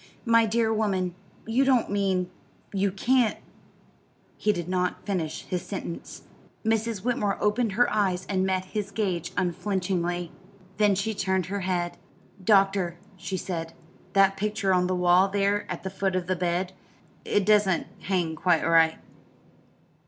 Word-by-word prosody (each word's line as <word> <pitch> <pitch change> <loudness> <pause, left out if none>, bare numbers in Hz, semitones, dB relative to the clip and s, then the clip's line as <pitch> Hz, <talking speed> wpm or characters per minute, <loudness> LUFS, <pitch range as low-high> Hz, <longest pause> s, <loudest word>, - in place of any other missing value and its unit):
"My 230 -1 +5
dear 225 0 +1
woman, 190 -5 0 0.3
you 235 +4 +2
don't 260 -6 +2
mean 190 -3 0 0.4
you 195 0 +1
can't 235 +3 +2 0.5
" - - -36
He 210 - +4
did 175 -4 -4
not 180 0 -1
finish 165 -6 -2
his 180 -3 -3
sentence. 185 -4 -7 0.4
Mrs. 225 -2 0
Whitmore 210 -5 0
opened 210 0 +1
her 245 +4 +4
eyes 185 -3 +1
and 190 -1 0
met 190 -1 0
his 205 +1 -4
gaze 190 -5 -2
unflinchingly. 175 -1 -1 0.5
Then 210 -2 +4
she 200 +3 -1
turned 190 -2 0
her 200 +3 -3
head. 180 -2 -2 0.5
"Doctor," 195 -3 +3 0.2
she 185 +1 -4
said, 165 -3 -4 0.4
"that 195 0 +4
picture 210 -1 0
on 180 0 +2
the 185 - 0
wall 180 +2 +4
there 200 0 0
at 180 - -5
the 190 - -4
foot 195 -1 -1
of 185 -1 -1
the 185 +1 0
bed 180 +1 -1 0.5
it 205 -2 +1
doesn't 205 -4 +3
hang 175 -4 -1
quite 170 0 +2
straight." 165 -1 +4
190 Hz, 150 wpm, -26 LUFS, 180-210 Hz, 0.5 s, My